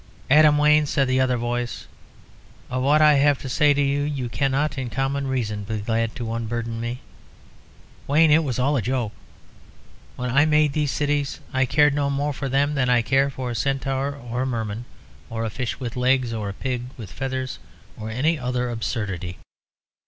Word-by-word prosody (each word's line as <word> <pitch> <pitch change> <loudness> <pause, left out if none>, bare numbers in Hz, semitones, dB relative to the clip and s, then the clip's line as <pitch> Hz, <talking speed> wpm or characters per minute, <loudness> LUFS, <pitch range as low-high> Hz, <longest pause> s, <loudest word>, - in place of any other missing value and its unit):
"Adam 150 0 +7
Wayne," 150 0 +4
said 140 -2 +1
the 130 0 +2
other 130 -1 +2
voice, 120 0 -3 0.9
"of 130 0 -1
what 150 +3 +4
I 150 0 +7
have 145 0 +4
to - - -5
say 145 +3 +3
you 140 -2 0
cannot 140 +4 0
in 130 -3 -4
common 135 +2 -1
reason 110 -6 -2
be 110 +2 -3
glad 115 +2 -1
to 115 -2 -4
unburden 115 0 -3
me. 120 +2 -4 1.1
Wayne, 155 +2 +4
it 160 +2 +5
was 130 -6 -2
all 135 +3 +2
a 130 - +1
joke. 120 0 -1 1.0
When 125 0 -3
I 135 +3 +5
made 150 -2 +3
these 150 -1 0
cities, 145 0 -1
I 130 0 +2
cared 150 +2 +4
no 140 -1 0
more 145 +1 -1
for 135 0 -4
them 140 +3 +2
than 130 -3 +1
I 120 -1 +4
care 135 +3 +2
for 130 -2 -5
a - - -4
centaur, 135 +1 -1
or 120 -2 -4
a - - 0
merman, 115 -2 -3 0.4
or 115 0 -3
a 110 - -3
fish 125 +2 -4
with 125 -2 -5
legs, 125 -1 +2
or 105 -3 -3
a - - -5
pig 125 +2 -3
with 110 -6 -9
feathers, 130 -1 -4 0.4
or 110 0 -6
any 145 +8 0
other 125 -1 -2
absurdity. 100 -6 -3
130 Hz, 185 wpm, -23 LUFS, 120-140 Hz, 1.1 s, Adam